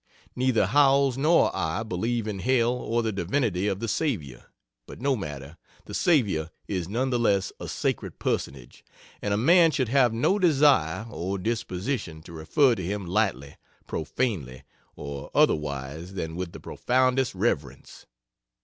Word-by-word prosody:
Neither 125 -5 +2
Howells 135 +3 +4
nor 155 +5 +3
I 80 +7 -1
believe 110 +3 -2
in 100 -2 -4
hell 120 +1 +2
or 120 -1 -1
the 110 - 0
divinity 100 0 -1
of 95 -2 -1
the 115 - -3
Savior, 105 - -2 0.4
but - - -10
no 135 +2 +1
matter, 75 - -7 0.3
the - - -10
Savior 100 - +2 0.2
is 90 -3 -3
none 130 +5 -1
the 120 - +1
less 100 -4 +1
a - - -6
sacred - - -3
Personage, 65 -3 -4 0.4
and 105 - -2
a 100 - +2
man 165 - +5
should 130 -6 -1
have 125 -2 +4
no 120 - +1
desire 140 - +3
or 95 +2 -3
disposition 100 - -3
to 85 - -12
refer 120 - +3
to 95 - -4
him 100 +2 -3
lightly, 90 - -1 0.3
profanely, 80 - -3 0.3
or 70 -1 -7
otherwise 75 +5 0
than 80 -3 -4
with 90 -1 -4
the - - -10
profoundest 130 -2 0
reverence. 75 - -3
105 Hz, 150 wpm, -26 LUFS, 85-130 Hz, 0.4 s, man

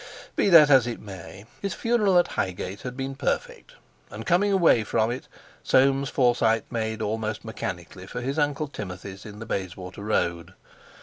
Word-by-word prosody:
Be - - +2
that 155 -5 +8
as 130 -3 +6
it 120 - -4
may, 95 0 -10 0.2
his 195 -3 -2
funeral 220 -6 +2
at 175 - +4
Highgate 95 +1 -3
had 125 0 -6
been 135 0 -3
perfect, 135 0 -3 0.3
and 110 +2 -8
coming 190 - +3
away 170 - +4
from 110 +2 +1
it 125 - -6 0.3
Soames 135 +1 +3
Forsyte 120 -4 +2
made 110 -1 -2
almost 110 0 -3
mechanically 90 -4 -6
for 125 - -5
his 135 +5 -2
Uncle 145 +1 0
Timothy's 95 -4 -8
in 105 0 -10
the 110 - -7
Bayswater 95 0 -5
Road. 85 -4 -1
115 Hz, 165 wpm, -25 LUFS, 100-140 Hz, 0.3 s, that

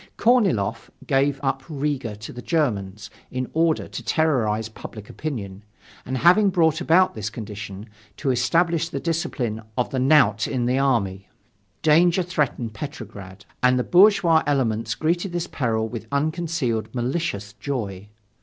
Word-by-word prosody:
Korniloff 175 - +2 0.2
gave 140 0 +1
up 135 0 0
Riga 140 -7 -2
to 105 +1 -9
the 125 - -8
Germans 105 - -1 0.2
in 130 0 -3
order 160 0 +1
to - - -7
terrorize 115 -9 +1
public 110 -1 -10
opinion, 105 -10 -5 0.4
and 130 +1 -2
having 180 - +5
brought 165 -3 +2
about 180 +2 +4
this 105 -1 -4
condition, 105 -2 -8 0.3
to 135 -2 0
establish 165 +7 +1
the 140 - -4
discipline 145 - -2 0.2
of 125 - 0
the 130 - -1
knout 130 -6 +4
in 125 -3 -1
the 125 +2 +1
army. 100 -8 0 0.5
Danger 170 +4 +4
threatened 145 -9 -2
Petrograd. 105 -6 -8 0.2
And 125 0 +4
the 125 - +1
bourgeois 180 - +5
elements 115 -5 0
greeted 175 +3 -1
this 175 -1 -1
peril 115 -8 -1
with 115 -1 -7
unconcealed 140 - -1
malicious 120 -6 -2
joy. 105 -7 -5
130 Hz, 140 wpm, -23 LUFS, 110-160 Hz, 0.5 s, having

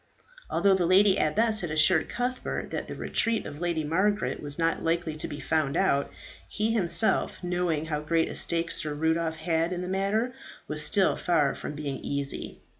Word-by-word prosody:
Although 200 -1 +3
the 180 -3 +1
lady 190 +2 +5
abbess 215 +8 +2
had 175 - -3
assured 160 +2 +4
Cuthbert 250 +1 -3
that - - -4
the - - -6
retreat 230 -1 -1
of 145 0 -8
Lady 170 -3 -1
Margaret 195 +7 0
was 145 -1 -4
not 165 0 0
likely 165 -1 -1
to - - -4
be 145 - -7
found 145 0 0
out, 140 0 +1 0.4
he 215 +2 -1
himself, 220 0 +1
knowing 175 -3 -1
how 150 -2 -3
great 165 +2 +1
a - - -6
stake 170 0 0
Sir 150 -2 0
Rudolph 160 +1 0
had 160 +1 -1
in 180 0 -3
the - - -5
matter, 200 +6 0 0.3
was 150 0 +3
still 190 +5 +3
far 155 -6 +1
from 150 - -7
being 145 -2 -4
easy. 140 -1 -4
165 Hz, 185 wpm, -27 LUFS, 150-190 Hz, 0.4 s, lady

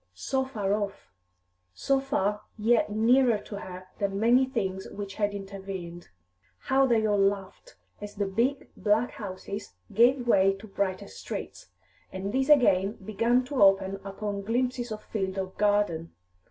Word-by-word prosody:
so 265 - -1
far 210 -7 -2
off; 205 -1 -4 0.6
so 275 - +1
far, 210 -7 -1 0.2
yet 225 +1 +2
nearer 235 +2 +4
to 205 0 -8
her 185 -1 -9
than 200 -1 -1
many 245 +4 +4
things 190 -7 -3
which 200 -1 -6
had 205 0 0
intervened. 195 -3 -7 0.5
How 270 +1 +2
they 225 -3 +2
all 205 -1 +2
laughed, 195 - -1 0.3
as 205 0 -8
the 200 -1 -1
big, 235 +8 0
black 220 +3 +1
houses 200 - -7 0.2
gave 245 +3 +4
way 195 -3 +4
to 195 +3 -12
brighter 195 -2 -2
streets, - - -7 0.4
and 195 +2 -4
these 265 +2 +1
again 205 -9 +5
began 230 +5 +1
to 265 -1 -2
open 195 0 +4
upon 200 +1 -4
glimpses 245 +2 -1
of 215 0 -6
field 190 -3 -3
or 190 -1 -2
garden! 205 -6 +1
205 Hz, 150 wpm, -28 LUFS, 195-240 Hz, 0.6 s, again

